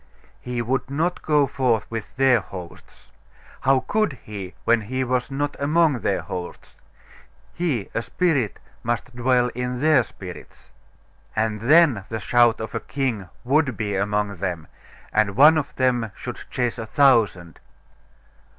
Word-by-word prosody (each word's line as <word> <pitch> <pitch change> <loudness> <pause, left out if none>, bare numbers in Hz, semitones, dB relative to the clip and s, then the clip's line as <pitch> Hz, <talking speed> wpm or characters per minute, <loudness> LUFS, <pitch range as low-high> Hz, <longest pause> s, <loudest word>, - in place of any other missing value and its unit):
He 125 -1 -3
would 130 +3 -1
not 165 +6 -1
go 150 -2 +3
forth 125 -5 0
with 115 -2 -6
their 130 -2 +4
hosts. 90 -3 -11 0.5
How 135 0 +3
could 215 -3 0
He, 100 -3 -8
when 115 0 +4
He 130 +5 -2
was 125 0 -1
not 145 +1 -2
among 150 -1 +2
their 100 -3 0
hosts? 90 -1 -7 0.8
He, 150 - -1
a 115 - 0
spirit, 135 - 0 0.2
must 120 +1 -3
dwell 125 0 +2
in 125 0 -3
their 155 -1 +5
spirits.... 95 -5 -11 0.6
And 110 -1 -1
then 140 - +4
the 110 - -3
shout 120 0 +3
of 110 -1 -6
a - - -1
king 120 -9 -3
would 135 -2 +1
be 105 -3 -2
among 100 0 -1
them, 85 -3 -3 0.5
and 105 -2 +2
one 150 +6 +7
of 150 -3 -2
them 125 -4 +1
should - - -7
chase 120 -1 -2
a 110 - -5
thousand.... 110 - +2
120 Hz, 145 wpm, -23 LUFS, 105-135 Hz, 0.8 s, one